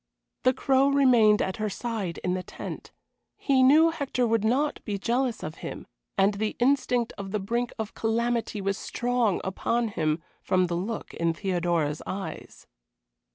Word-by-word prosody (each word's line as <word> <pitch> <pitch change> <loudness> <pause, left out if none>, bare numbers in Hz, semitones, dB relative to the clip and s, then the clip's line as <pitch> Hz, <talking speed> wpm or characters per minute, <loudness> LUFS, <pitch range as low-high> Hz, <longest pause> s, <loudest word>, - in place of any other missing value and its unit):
The 255 - +4
Crow 270 0 +3
remained 245 -7 +5
at 190 - -3
her 215 -1 -1
side 205 -5 -4
in 180 - 0
the 185 - -1
tent. - - -8 0.5
He 270 -2 +2
knew 310 +5 +6
Hector 275 -5 -1
would 225 -2 +1
not 265 +7 +1
be 205 -1 -3
jealous 240 +3 -1
of 155 +1 -6
him, - - -6 0.3
and 195 +2 +4
the 210 +1 -2
instinct 250 -2 +1
of 195 -1 -5
the 210 +2 -1
brink 235 +5 -1
of 220 -2 -4
calamity 230 -1 -1
was 195 0 -1
strong 240 -5 0
upon 230 +5 -1
him, 155 -4 -1 0.2
from 185 0 +2
the 175 -1 -2
look 205 +6 -4
in 165 -1 0
Theodora's 170 -5 0
eyes. 195 0 -6
220 Hz, 160 wpm, -27 LUFS, 190-245 Hz, 0.5 s, knew